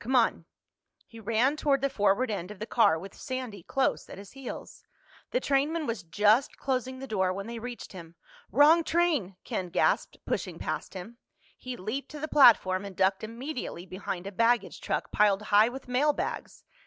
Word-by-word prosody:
Come 250 +7 -1
on." 235 -3 +2 0.6
He 230 - -13
ran 230 +7 +1
toward 280 -3 +1
the 275 - +2
forward 220 -1 +1
end 180 -3 -4
of 210 - -9
the 215 - -5
car 225 -8 +3
with 190 +4 -9
Sandy 255 -7 -6
close 265 +10 -1
at - - -9
his 200 0 -11
heels. 270 -2 -9 0.5
The - - 0
trainman 300 - 0
was 230 -6 -3
just 210 - +2
closing 260 -1 -2
the 270 - -7
door 190 -7 0
when 195 +1 -5
they 235 0 -6
reached 245 +1 -7
him. 170 -2 -11 0.4
"Wrong 320 +3 +6
train!" 315 - +1
Ken 180 -1 -3
gasped, - - +1
pushing - - -3
past - - -4
him. 220 +6 -9 0.4
He 255 -1 -7
leaped 220 +9 -4
to 300 - -8
the 310 - -3
platform 210 -10 +5
and 200 -2 -8
ducked 190 +2 +1
immediately 235 - -6
behind 185 -1 -5
a 200 - -5
baggage 230 +4 +1
truck - - -2
piled 210 -1 +3
high 215 +3 +7
with 260 +1 -9
mailbags. 285 +4 -1
230 Hz, 180 wpm, -28 LUFS, 195-270 Hz, 0.6 s, high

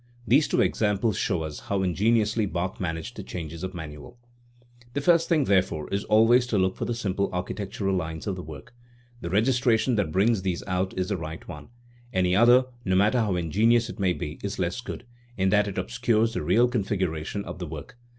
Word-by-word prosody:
These 140 +6 +4
two - - +2
examples 105 0 +1
show 80 - -1
us 75 -1 -6
how 100 -1 -2
in 90 -2 0
geniously 110 +1 +2
Bach 90 +2 -3
managed 80 -3 -4
the - - -4
changes 85 -1 -7
of 95 0 -5
manual. 75 +5 -9 0.8
The 140 - -1
first 170 +2 +3
thing, 160 -4 +3
therefore, 95 - +1
is 100 +1 -1
always 120 +3 +4
to 110 - 0
look 95 0 +1
for - - -3
the 120 - -2
simple 100 -3 -1
architectural 95 +2 -3
lines 80 -3 -4
of 100 - -2
the 90 - -6
work. 80 - -11 0.5
The 85 - -4
registration 120 +3 +2
that 95 -7 0
brings 100 +4 +2
these 90 -2 -2
out 95 0 -2
is 95 0 -1
the 100 - -1
right 80 -1 -7
one; 75 -1 -9 0.4
any 90 -4 +2
other, 120 +4 +6 0.2
no 95 -3 +1
matter 105 +6 +3
how 105 -5 +1
in 85 -3 -3
genious 115 +4 +3
it - - -12
may 95 -2 +2
be, 75 -2 -6
is 100 0 -4
less 90 +6 -2
good, 125 0 -7 0.3
in 95 0 +2
that 105 +1 +3
it 100 - -5
obscures 110 - +1
the - - -2
real 110 +11 +3
configuration 100 -5 -2
of - - -7
the 90 - -4
work. 80 +11 -8
95 Hz, 210 wpm, -26 LUFS, 90-115 Hz, 0.8 s, other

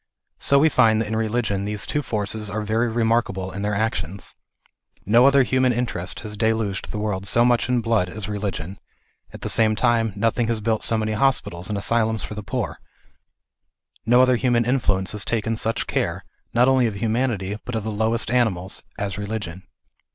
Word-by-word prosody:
So 140 - +3
we 150 +3 +5
find 110 -7 +4
that 110 - -1
in 110 - -2
religion 110 -3 -1
these 105 +1 -1
two 150 +2 -1
forces 105 -3 -3
are 105 +2 -3
very 110 +3 +1
remarkable 110 -5 0
in 100 - -6
their 105 0 -1
actions. 100 -4 -2 0.7
No 120 +6 +5
other 140 -1 +5
human 130 0 +2
interest 115 -7 -1
has 105 -1 -6
deluged 110 -2 -1
the - - -5
world 100 -2 -2
so 120 +3 +4
much 120 -1 +2
in 125 -1 +2
blood 115 -5 +1
as 105 +1 -6
religion; 100 -3 -4 0.5
at - - -11
^he - - -3
same 110 -1 +3
time 115 -1 +2
nothing 115 +2 0
has 115 -1 0
built 110 0 -1
so 115 - +3
many 110 0 -1
hospitals 110 -8 0
and 105 - -2
asylums 110 0 +1
for - - -6
the 105 - -5
poor; 105 - -4 1.2
no 120 +2 +5
other 130 -1 +3
human 120 -2 +2
influence 100 -7 +1
has 105 -1 -1
taken 115 0 -1
such 115 0 -1
care, - - -2 0.3
not 120 +2 +4
only 130 -2 +4
of 110 - -4
humanity, 110 -2 -1
but 125 - -5
of 110 - -2
the 110 - -3
lowest 110 +2 0
animals, 100 -7 0 0.2
as 100 -1 -3
religion. 100 -4 -5
110 Hz, 190 wpm, -23 LUFS, 100-120 Hz, 1.2 s, we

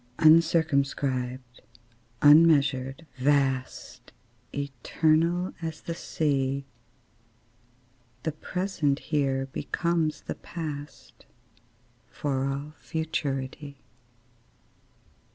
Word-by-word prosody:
Uncircumscribed, 140 -6 +2 0.6
unmeasured, 145 -2 +5
vast, 135 -1 0 0.4
Eternal 155 +6 0
as 160 -2 -5
the 170 - -4
Sea, 140 -4 -1 1.6
The 160 - -1
present 155 -3 -1
here 135 -4 0
becomes 170 -1 -1
the - - -5
past, 150 -4 -8 0.8
For 135 -2 -2
all 140 +2 -4
futurity. 140 -3 -3
145 Hz, 65 wpm, -27 LUFS, 135-160 Hz, 1.6 s, unmeasured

